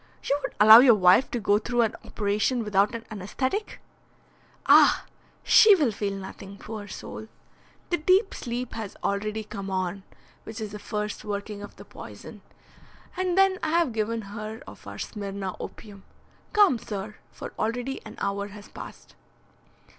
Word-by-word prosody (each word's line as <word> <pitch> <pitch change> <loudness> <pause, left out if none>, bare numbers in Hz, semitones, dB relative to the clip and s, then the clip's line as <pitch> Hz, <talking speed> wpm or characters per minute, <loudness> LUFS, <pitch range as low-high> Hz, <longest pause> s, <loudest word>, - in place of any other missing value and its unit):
You 285 - 0
would - - -5
allow 215 +2 +11
your 245 -2 +7
wife 185 +6 +5
to 240 - -2
go 205 -1 +2
through 240 +2 0
an 225 - -1
operation 215 +4 -1
without 210 +2 +2
an 230 - -7
anaesthetic?" 260 - -3 0.9
"Ah! - - +6 0.4
she 430 -2 +7
will 295 -10 +1
feel 200 -1 -3
nothing, 195 +1 -9
poor 215 0 -8
soul. 220 +2 -8 0.6
The 350 - +2
deep 375 +6 +3
sleep 245 0 -5
has 220 -3 -6
already 215 +2 -2
come 200 -2 -7
on, 185 0 -2 0.4
which 225 +1 -8
is 215 -2 -5
the 210 - -7
first 210 0 -4
working 205 0 -5
of 205 - -10
the - - -13
poison. - - -11 0.7
And 370 0 -1
then 390 -1 +4
I 315 - -1
have 330 -8 +1
given 225 +1 -2
her 215 +2 -7
of - - -13
our - - -8
Smyrna 200 -3 -5
opium. 200 -3 -10 0.5
Come, 405 - +4
sir, 210 0 -6
for - - -9
already 245 +4 -2
an - - -10
hour 200 0 -2
has 205 0 -12
passed." - - -11
215 Hz, 160 wpm, -26 LUFS, 200-245 Hz, 0.9 s, allow